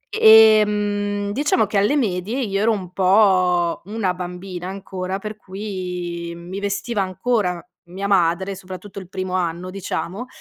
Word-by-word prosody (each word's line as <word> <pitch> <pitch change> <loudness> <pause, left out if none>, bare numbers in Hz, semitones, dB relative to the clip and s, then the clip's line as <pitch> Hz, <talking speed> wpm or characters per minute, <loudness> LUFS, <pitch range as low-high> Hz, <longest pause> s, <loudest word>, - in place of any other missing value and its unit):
Ehm, 210 -2 +5
diciamo 255 -2 +2
che, 205 0 -2
alle 210 +9 +2
medie 215 -2 -1
io 200 -4 -1
ero 230 - +3
un 185 -4 -4
po' 185 -3 +3
una 205 -2 -1
bambina 180 0 -6
ancora, 190 -1 -5
per 215 +1 -6
cui 180 -4 -5
mi 175 +3 -7
vestiva 200 +2 -2
ancora 190 -1 -1 0.3
mia 195 +3 -4
madre, 190 0 +2
soprattutto 185 +2 -9
il 185 -2 -12
primo 185 -1 -4
anno, 180 0 -2
diciamo, 195 +3 -4
195 Hz, 140 wpm, -21 LUFS, 180-210 Hz, 0.3 s, Ehm